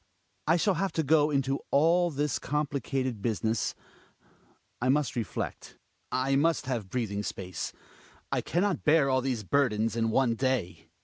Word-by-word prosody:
I 165 +2 +5
shall 195 +3 +2
have 190 +2 -1
to 160 - 0
go 150 +1 +4
into 135 -1 0
all 170 +5 +4
this 145 -2 -1
complicated 135 -5 -2
business 110 0 -1 0.5
— - - -34
I 125 - +1
must 145 0 +1
reflect; 115 -4 -4 0.3
I 130 +1 +1
must 155 +1 +2
have 120 -7 -3
breathing 105 -4 -2
space; 95 -3 -5 0.6
I - - +1
can 175 +3 0
not 200 -6 0
bear 150 -3 +4
all 130 0 +2
these 125 -4 -2
burdens 115 -2 +1
in 115 -1 +1
one 120 +1 +2
da 130 +3 +2
y. 80 -3 -20
135 Hz, 165 wpm, -29 LUFS, 115-150 Hz, 0.6 s, I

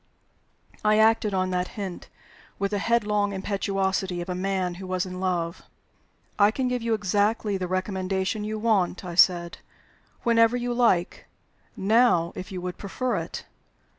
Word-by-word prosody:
I 215 0 +4
acted 220 -1 +4
on 185 0 0
that 180 0 0
hint, 195 -4 -6 0.5
with 200 0 -1
the 205 - 0
headlong 210 -2 +1
impetuosity 190 -2 -1
of 175 +2 -5
a - - -1
man 185 -1 -1
who 190 - -7
was 185 +1 -1
in 185 0 -7
love. 175 -2 -2 0.8
"I 205 0 +6
can 255 +4 -1
give 250 -1 -1
you 230 -1 +1
exactly 205 +1 0
the 185 -1 -2
recommendation 190 +2 -2
you 215 +1 -3
want," 205 -5 +1
I 175 - -5
said, 170 -1 +3 0.6
"whenever 230 0 +4
you 245 0 -2
like. 230 -8 +1 0.5
Now, 200 -4 +3
if 185 - -7
you 185 -2 -5
would 180 0 -5
prefer 245 +6 -2
it." - - -5
195 Hz, 155 wpm, -25 LUFS, 185-215 Hz, 0.8 s, I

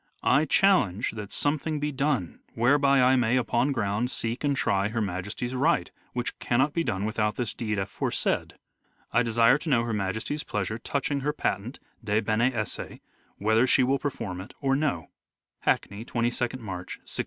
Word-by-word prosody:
I 140 +4 +4
challenge 130 - +3
that 105 -2 -7
something 150 +1 -1
be 150 +1 -1
done 135 - -1 0.2
whereby 140 +2 +4
I 130 +1 +5
may, 125 0 +2
upon 125 +2 +1
ground, 110 -1 0
seek 115 +1 -3
and 145 -1 +2
try 100 -4 +1
Her 115 +2 -2
Majesty's 105 +5 -3
right, 130 +1 +1 0.2
which 120 -1 -3
cannot 130 +5 +1
be 165 - +1
done 105 -6 -1
without 105 -1 0
this 120 -5 -2
deed 110 -3 -2
afore 95 0 -2
said. - - 0 0.6
I 120 - +4
desire 115 +3 +4
to 160 - -5
know 120 -5 +3
Her 115 -1 -2
Majesty's 110 +9 -2
pleasure 105 +2 -3
touching 140 +3 -1
her 145 +2 -1
patent 115 -3 -2 0.2
(de 105 -1 +1
bene 115 +3 +2
esse) 110 -4 -4 0.4
whether 110 +4 +3
she 130 - +4
will 135 +2 +2
perform 95 -10 -4
it 100 - -12
or 135 -1 +1
no." 135 - -1 0.5
Hackney, 100 +2 0
22nd 120 +1 -1
March, 90 -4 -6
1601. - - -7
120 Hz, 175 wpm, -27 LUFS, 105-135 Hz, 0.6 s, I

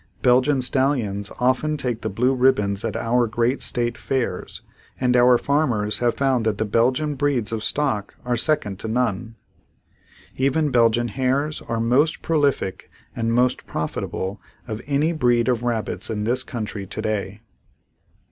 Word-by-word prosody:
Belgian 130 +2 +3
stallions 125 -7 0
often 130 +5 +1
take 120 -5 -3
the 110 - -2
blue 125 +6 +1
ribbons 105 -7 +2
at 115 - -3
our 120 +1 +1
great 120 +4 0
state 120 -1 -1
fairs 125 -9 -3 0.4
and 125 -1 +2
our 125 0 +6
farmers 115 -8 0
have 120 -1 +1
found 135 -4 +1
that 110 -2 0
the 110 - 0
Belgian 130 +8 +1
breeds 135 -6 0
of 110 -1 -3
stock 135 -9 -1
are 125 0 +1
second 115 -7 0
to - - -5
none. 115 -1 -1 1.0
Even 140 +3 +1
Belgian 120 -1 +3
hares 135 +6 -1
are 115 - -3
most 130 +8 +2
prolific 145 - 0 0.3
and 115 0 -1
most 125 +2 +1
profitable 95 +5 -4 0.3
of 110 -1 -5
any 145 +3 +1
breed 120 -6 +2
of 125 -3 +1
rabbits 115 -4 -2
in 105 -2 -2
this 120 +4 0
country 105 -4 -5
today. 105 -1 -3
120 Hz, 145 wpm, -22 LUFS, 110-130 Hz, 1.0 s, our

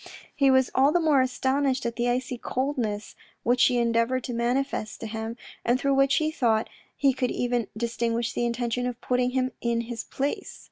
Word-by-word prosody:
He 275 -2 +4
was 260 -1 +4
all 270 +3 +4
the 350 - +3
more 305 -5 +4
astonished 260 0 0
at 235 0 -2
the 240 0 0
icy 250 +1 -1
coldness 240 -5 -2 0.3
which 245 +1 +2
she 245 0 +4
endeavoured 235 +2 +1
to 245 - -4
manifest 240 -1 -1
to - - -4
him, 220 +1 -5 0.3
and 240 +2 +2
through 275 +1 +1
which 275 0 +4
he 310 0 +1
thought 230 -7 +1 0.3
he 275 -1 +3
could 250 -1 -1
even 245 -3 -1
distinguish 235 0 -1
the - - -1
intention 240 +1 -1
of 245 -1 -5
putting 250 0 +1
him 255 0 0
in 235 -1 0
his 235 -1 -5
place. 290 +10 -4
245 Hz, 190 wpm, -26 LUFS, 235-265 Hz, 0.3 s, He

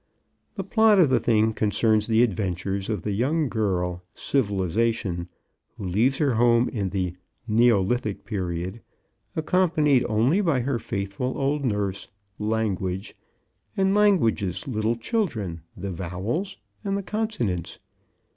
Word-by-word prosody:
The 195 - -3
plot 220 +2 +4
of 165 -8 +5
the 130 - +4
thing 110 -1 +2
concerns 110 0 +2
the 115 +1 +4
adventures 95 -2 -2
of 105 -6 -2
the 105 - -2
young 140 +8 +1
girl 90 -6 -1
Civilization 100 -5 0 0.5
who 100 - -6
leaves 115 +9 +2
her 140 -4 +2
home 120 +1 +4
in 100 -5 -2
the 90 -2 -2 0.3
Neolithic 110 -1 +2
Period 95 0 -3 0.5
accompanied 155 -5 +2
only 120 - +3
by 160 -10 +1
her 125 -1 -1
faithful 100 +6 -3
old 140 +1 0
nurse 105 -5 -1 0.3
Language 105 -3 -2 0.6
and 190 0 +3
Language's 115 - +2
little 110 -2 0
children 115 - -2 0.2
the 100 +1 -4
Vowels 95 - -3 0.3
and 200 -1 -1
the 200 - -4
Consonants. 185 - -2
110 Hz, 125 wpm, -25 LUFS, 95-135 Hz, 0.6 s, of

